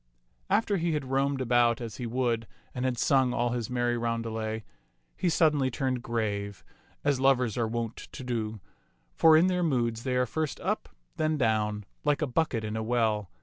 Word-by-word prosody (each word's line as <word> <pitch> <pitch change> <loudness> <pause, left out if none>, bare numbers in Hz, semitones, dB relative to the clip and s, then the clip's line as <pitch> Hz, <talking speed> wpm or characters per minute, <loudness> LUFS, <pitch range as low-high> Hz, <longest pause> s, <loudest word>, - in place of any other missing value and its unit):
After 205 0 +2
he 170 -1 0
had 135 -4 -3
roamed 135 0 +1
about 120 -1 +3
as 115 -4 -6
he 120 - -4
would 115 -2 0 0.3
and 125 0 -2
had 125 -2 0
sung 130 -1 +3
all 120 +1 +1
his 120 -3 -2
merry 120 -1 0
roundelay, 115 -2 -2 0.5
he 180 - 0
suddenly 150 -5 +3
turned 130 0 -1
grave, 100 -4 -3 0.4
as 145 -2 +2
lovers 130 -4 +3
are 120 -2 0
wont 115 0 -3
to - - -8
do; 110 -3 -3 0.5
for 160 - +6
in 165 - +5
their 180 -1 +1
moods 120 -8 0
they 130 0 -1
are 125 0 +3
first 155 +2 -3
up, - - -2 0.3
then 155 0 +1
down, 105 -4 0 0.2
like 150 0 +1
a - - +3
bucket 130 -4 0
in 105 0 -3
a 110 - -1
well. 110 -4 0
120 Hz, 185 wpm, -28 LUFS, 115-135 Hz, 0.5 s, for